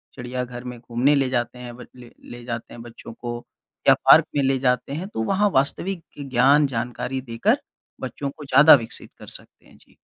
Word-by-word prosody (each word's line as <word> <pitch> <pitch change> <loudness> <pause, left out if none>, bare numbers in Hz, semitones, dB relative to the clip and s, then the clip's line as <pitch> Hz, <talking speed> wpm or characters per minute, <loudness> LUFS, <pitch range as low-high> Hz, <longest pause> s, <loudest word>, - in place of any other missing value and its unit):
चिड़ियाघर 125 0 -6
में 125 -1 -8
घूमने 125 +4 +1
ले 135 -2 +1
जाते 125 -1 -2
हैं 120 -1 -9
बच 125 - -11
ले 120 -2 -14 0.2
ले 120 0 -10
जाते 115 -1 -6
हैं 115 - -10
बच्चों 115 -1 -11
को, 120 +1 -7 0.4
या - - +9
पार्क - - +6
में 140 - +2
ले 135 0 +2
जाते 125 +1 0
हैं, 175 +6 -4
तो 110 - -4
वहाँ 200 - +1
वास्तविक 165 +6 -1 0.2
ज्ञान, 140 +2 +3
जानकारी 125 +1 -4
देकर 115 -2 0 0.4
बच्चों 140 -1 -5
को 150 - -9
ज़्यादा 150 +3 +7
विकसित 115 -5 -5
कर - - -12
सकते - - -14
हैं। - - -20
जी। - - -22
125 Hz, 195 wpm, -22 LUFS, 120-140 Hz, 0.4 s, या